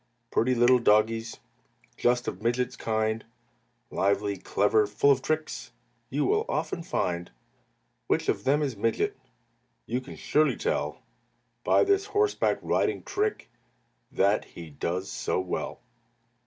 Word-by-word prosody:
Pretty 125 Hz, +2 st, +2 dB
little 120 Hz, +1 st, +5 dB
doggies 115 Hz, +1 st, +2 dB, 0.6 s
Just 120 Hz, 0 st, +1 dB
of 95 Hz, -, -4 dB
Midget's 120 Hz, +2 st, 0 dB
kind, 110 Hz, 0 st, -1 dB, 0.7 s
Lively, 100 Hz, +1 st, +1 dB
clever, 105 Hz, +3 st, +2 dB
full 105 Hz, +7 st, +3 dB
of 135 Hz, -1 st, +2 dB
tricks, 155 Hz, +2 st, -2 dB, 0.4 s
You -, -, 0 dB
will 425 Hz, +1 st, +2 dB
often 170 Hz, -, -2 dB
find. 90 Hz, -, -2 dB, 0.8 s
Which -, -, +1 dB
of -, -, 0 dB
them 145 Hz, +3 st, +2 dB
is 135 Hz, -5 st, -2 dB
Midget 115 Hz, -, 0 dB, 0.7 s
You 125 Hz, +3 st, -2 dB
can 130 Hz, -, -10 dB
surely 155 Hz, 0 st, +2 dB
tell 470 Hz, +3 st, -2 dB, 0.6 s
By -, -, +4 dB
this 400 Hz, 0 st, +2 dB
horseback 415 Hz, 0 st, +1 dB
riding -, -, 0 dB
trick 415 Hz, +2 st, -2 dB, 0.6 s
That 100 Hz, +2 st, +2 dB
he 85 Hz, -2 st, -11 dB
does 90 Hz, +6 st, -3 dB
so -, -, -1 dB
well. 95 Hz, +4 st, -4 dB
120 Hz, 130 wpm, -27 LUFS, 105-150 Hz, 0.8 s, little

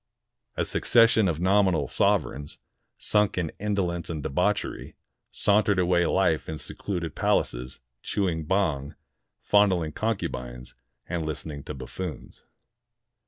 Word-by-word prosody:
A -, -, +1 dB
succession 115 Hz, -3 st, +4 dB
of 80 Hz, -3 st, -1 dB
nominal 95 Hz, -5 st, +3 dB
sovereigns, 70 Hz, +3 st, 0 dB, 0.4 s
sunk 105 Hz, -2 st, +1 dB
in 85 Hz, -3 st, -1 dB
indolence 90 Hz, -5 st, -1 dB
and 80 Hz, -3 st, -4 dB
debauchery, 90 Hz, +9 st, -1 dB, 0.3 s
sauntered 105 Hz, -1 st, +2 dB
away 90 Hz, -1 st, +3 dB
life 90 Hz, -5 st, +1 dB
in 80 Hz, -, -4 dB
secluded 85 Hz, -2 st, -4 dB
palaces, 65 Hz, +2 st, -1 dB, 0.2 s
chewing 85 Hz, -6 st, -1 dB
bhang, 80 Hz, -7 st, 0 dB, 0.5 s
fondling 95 Hz, -6 st, +3 dB
concubines, 60 Hz, -, -4 dB, 0.3 s
and 85 Hz, -2 st, -2 dB
listening 75 Hz, -1 st, -5 dB
to 75 Hz, -, -6 dB
buffoons. 65 Hz, 0 st, -7 dB
85 Hz, 110 wpm, -26 LUFS, 75-100 Hz, 0.5 s, succession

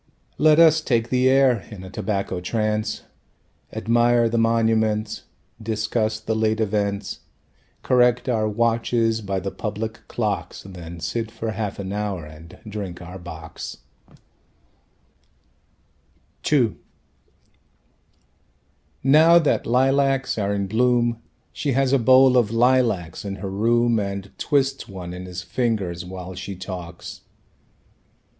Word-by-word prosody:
Let 155 Hz, 0 st, +5 dB
us 160 Hz, -1 st, +6 dB
take 120 Hz, -5 st, 0 dB
the 130 Hz, 0 st, +3 dB
air, 130 Hz, -3 st, +4 dB
in 100 Hz, -4 st, -9 dB
a 95 Hz, -, -9 dB
tobacco 100 Hz, -3 st, -2 dB
trance, 110 Hz, +2 st, -1 dB, 0.7 s
Admire 120 Hz, 0 st, +2 dB
the 115 Hz, 0 st, 0 dB
monuments 110 Hz, -1 st, +1 dB, 0.4 s
Discuss 110 Hz, 0 st, -1 dB
the 110 Hz, 0 st, -2 dB
late 110 Hz, 0 st, +1 dB
events, 100 Hz, -2 st, -1 dB, 0.6 s
Correct 125 Hz, 0 st, +3 dB
our 110 Hz, -4 st, +1 dB
watches 115 Hz, 0 st, +1 dB
by 95 Hz, -2 st, -2 dB
the 95 Hz, +1 st, -4 dB
public 110 Hz, +1 st, -4 dB
clocks. -, -, -3 dB
Then 85 Hz, -3 st, -9 dB
sit 110 Hz, +7 st, -3 dB
for 115 Hz, 0 st, -4 dB
half 105 Hz, -2 st, -4 dB
an 95 Hz, 0 st, -5 dB
hour 100 Hz, -5 st, -3 dB
and 80 Hz, +2 st, -13 dB
drink 100 Hz, -5 st, -6 dB
our 90 Hz, +1 st, -9 dB
bocks. 80 Hz, -2 st, -8 dB, 2.7 s
II 125 Hz, -8 st, +3 dB, 2.3 s
Now 155 Hz, +5 st, +6 dB
that 160 Hz, -4 st, +1 dB
lilacs 135 Hz, +2 st, +2 dB
are 100 Hz, -1 st, 0 dB
in 100 Hz, -1 st, -1 dB
bloom 120 Hz, +2 st, +1 dB, 0.3 s
She 140 Hz, -3 st, -1 dB
has 135 Hz, +1 st, +2 dB
a 140 Hz, -, +4 dB
bowl 130 Hz, +1 st, +6 dB
of 120 Hz, -4 st, +3 dB
lilacs 115 Hz, -7 st, +1 dB
in 100 Hz, -1 st, -4 dB
her 95 Hz, 0 st, -6 dB
room 115 Hz, +3 st, +2 dB
And 100 Hz, -1 st, -4 dB
twists 135 Hz, -2 st, 0 dB
one 90 Hz, -3 st, -7 dB
in 90 Hz, +1 st, -7 dB
her 90 Hz, -, -10 dB
fingers 95 Hz, -3 st, -2 dB
while 90 Hz, 0 st, -8 dB
she 90 Hz, +2 st, -6 dB
talks. 90 Hz, -2 st, -8 dB
110 Hz, 125 wpm, -23 LUFS, 95-120 Hz, 2.7 s, us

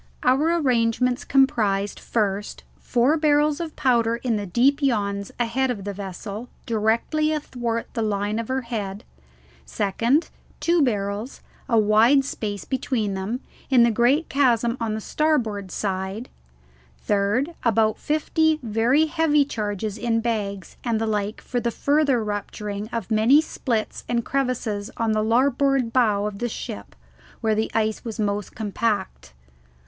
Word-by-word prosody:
Our 290 Hz, +7 st, +3 dB
arrangements 250 Hz, -3 st, +1 dB
comprised, 210 Hz, -7 st, +2 dB
first, 205 Hz, -2 st, -2 dB, 0.2 s
four 250 Hz, +6 st, +2 dB
barrels 300 Hz, 0 st, +2 dB
of 330 Hz, -2 st, -5 dB
powder 235 Hz, -3 st, +2 dB
in 235 Hz, -1 st, -1 dB
deep 270 Hz, -, +3 dB
yawns 200 Hz, -7 st, 0 dB
ahead 245 Hz, +3 st, +1 dB
of 215 Hz, -6 st, -3 dB
the 200 Hz, 0 st, -4 dB
vessel, 200 Hz, +4 st, -7 dB, 0.2 s
directly 230 Hz, +8 st, +1 dB
athwart 240 Hz, -6 st, -2 dB
the 230 Hz, -, -2 dB
line 210 Hz, 0 st, -1 dB
of 230 Hz, -, -4 dB
her 260 Hz, 0 st, -1 dB
head; 210 Hz, -4 st, -5 dB, 0.6 s
second, 230 Hz, -, 0 dB, 0.3 s
two 340 Hz, -1 st, +2 dB
barrels, 210 Hz, -1 st, -1 dB, 0.3 s
a 230 Hz, -, +3 dB
wide 220 Hz, +6 st, +5 dB
space 205 Hz, -6 st, -4 dB
between 245 Hz, -6 st, -1 dB
them, 200 Hz, +7 st, -3 dB, 0.3 s
in 255 Hz, -3 st, +6 dB
the 235 Hz, -, +4 dB
great 250 Hz, +8 st, +2 dB
chasm 240 Hz, -4 st, +2 dB
on 225 Hz, -2 st, -1 dB
the 220 Hz, -, -4 dB
starboard 225 Hz, -10 st, 0 dB
side; 190 Hz, +4 st, -3 dB, 0.7 s
third, 210 Hz, +10 st, 0 dB
about 220 Hz, -2 st, +2 dB
fifty 315 Hz, +1 st, +1 dB
very 235 Hz, +7 st, +3 dB
heavy 310 Hz, -2 st, +2 dB
charges 210 Hz, -4 st, -3 dB
in 230 Hz, 0 st, +1 dB
bags 205 Hz, -5 st, -3 dB
and 230 Hz, -3 st, 0 dB
the 225 Hz, -, 0 dB
like 210 Hz, 0 st, -2 dB
for 245 Hz, -, -2 dB
the 235 Hz, -, -1 dB
further 280 Hz, -1 st, +2 dB
rupturing 205 Hz, 0 st, -4 dB
of 230 Hz, -4 st, -5 dB
many 225 Hz, +7 st, +5 dB
splits 240 Hz, -8 st, -2 dB
and 235 Hz, -1 st, 0 dB
crevices 245 Hz, -6 st, -1 dB
on 230 Hz, -1 st, +1 dB
the 215 Hz, 0 st, +1 dB
larboard 255 Hz, +1 st, +2 dB
bow 210 Hz, -5 st, +3 dB
of 205 Hz, -1 st, -4 dB
the 240 Hz, -, -1 dB
ship, 100 Hz, -, -7 dB, 0.5 s
where 220 Hz, -1 st, +2 dB
the 220 Hz, +1 st, 0 dB
ice 220 Hz, -1 st, 0 dB
was 225 Hz, -1 st, -6 dB
most 205 Hz, -1 st, -2 dB
compact. 200 Hz, -, -2 dB
230 Hz, 145 wpm, -23 LUFS, 210-260 Hz, 0.7 s, in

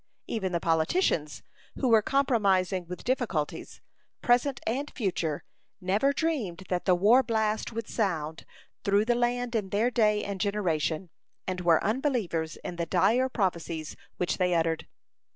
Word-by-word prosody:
Even 195 Hz, -5 st, -2 dB
the 170 Hz, -, 0 dB
politicians, 165 Hz, -, +1 dB, 0.3 s
who 265 Hz, -, -1 dB
were 225 Hz, -2 st, +6 dB
compromising 200 Hz, -9 st, +1 dB
with 180 Hz, 0 st, -7 dB
difficulties, 230 Hz, -, -2 dB, 0.4 s
present 250 Hz, +2 st, +2 dB
and 270 Hz, +6 st, -1 dB
future, 175 Hz, -, -2 dB, 0.4 s
never 200 Hz, +9 st, +2 dB
dreamed 275 Hz, -, -2 dB
that 180 Hz, -1 st, -1 dB
the 185 Hz, -, +4 dB
war 215 Hz, +8 st, +5 dB
blast 220 Hz, -3 st, -1 dB
would 230 Hz, -1 st, -5 dB
sound 160 Hz, -7 st, -2 dB, 0.4 s
through 200 Hz, +1 st, +3 dB
the 240 Hz, -, +3 dB
land 245 Hz, 0 st, 0 dB
in 210 Hz, -4 st, -1 dB
their 220 Hz, +5 st, +1 dB
day 210 Hz, -3 st, +2 dB
and 200 Hz, -2 st, -4 dB
generation, 180 Hz, -5 st, -1 dB, 0.3 s
and 185 Hz, -1 st, -3 dB
were 170 Hz, -2 st, +4 dB
unbelievers 215 Hz, -, -1 dB
in 175 Hz, -, -5 dB
the 170 Hz, -1 st, -2 dB
dire 240 Hz, +8 st, +3 dB
prophecies 170 Hz, -8 st, -2 dB, 0.2 s
which 180 Hz, -, -1 dB
they 180 Hz, -1 st, +2 dB
uttered. 165 Hz, -1 st, 0 dB
200 Hz, 145 wpm, -28 LUFS, 175-240 Hz, 0.4 s, were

